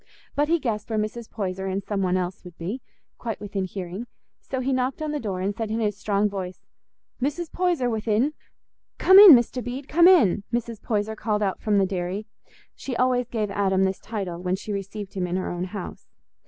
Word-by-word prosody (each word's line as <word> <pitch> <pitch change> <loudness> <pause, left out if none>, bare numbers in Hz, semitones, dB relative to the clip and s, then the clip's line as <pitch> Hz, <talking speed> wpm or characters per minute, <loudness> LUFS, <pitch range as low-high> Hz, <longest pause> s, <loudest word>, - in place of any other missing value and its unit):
But 290 +1 +2
he 335 +2 +3
guessed 220 -8 -3
where 220 - -1
Mrs. 215 +2 -3
Poyser 190 -2 -3
and 195 +1 -2
some 200 -1 -2
one 185 -1 +1
else 180 0 -3
would 180 -2 -12
be, 200 +10 -4 0.4
quite 225 -4 -4
within 200 -2 -3
hearing; 185 +4 -6 0.3
so 260 - -4
he 260 +1 0
knocked 255 +1 0
on 310 -1 -2
the 300 - -2
door 195 -6 -3
and 200 +2 -1
said 225 0 -3
in 220 +1 -1
his 210 -3 0
strong 205 0 +1
voice, 190 -3 -6 0.6
"Mrs. 295 +5 -2
Poyser 350 -8 +1
within?" 225 +4 +1 0.6
"Come 380 +1 +8
in, 405 -5 +12
Mr. 245 0 +3
Bede, 260 +3 -5
come 340 +2 +5
in," 250 - +5
Mrs. 235 -2 -3
Poyser 220 -1 -1
called 215 -1 -1
out 195 -2 -1
from 210 -2 +2
the 195 - +4
dairy. 185 +2 -3 0.5
She 260 - -5
always 250 0 +2
gave 215 -4 -2
Adam 190 -1 +2
this 190 0 0
title 190 -6 -5
when 180 0 0
she 205 +2 -5
received 200 0 -5
him 185 -2 -2
in 175 - -2
her 185 - -2
own 175 +1 -3
house. 185 0 -7
210 Hz, 210 wpm, -25 LUFS, 190-245 Hz, 0.6 s, in